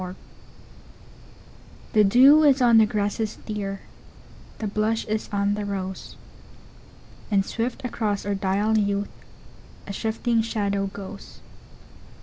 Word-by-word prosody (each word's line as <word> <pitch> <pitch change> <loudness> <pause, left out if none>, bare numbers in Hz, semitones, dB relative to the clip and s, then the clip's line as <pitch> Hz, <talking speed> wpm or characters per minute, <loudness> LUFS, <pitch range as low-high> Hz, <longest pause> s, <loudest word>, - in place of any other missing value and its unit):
Youth 185 0 -6 1.8
THE 215 - +5
DEW 260 +9 +7
is 280 -2 +5
on 235 -3 +6
the 220 - +5
grasses, 210 +1 -2
dear, 200 -2 -4 0.8
The 220 - -5
blush 215 +2 -1
is 215 0 -3
on 200 0 +1
the 210 0 -3
rose, 190 -2 -5 1.1
And 195 -2 +2
swift 240 +4 -4
across 215 -5 -2
our 205 - -1
dial 200 +3 +1
youth,A 200 0 -6
shifting 225 +2 0
shadow 200 -3 -1
goes. 195 0 -10
210 Hz, 115 wpm, -24 LUFS, 200-225 Hz, 1.8 s, DEW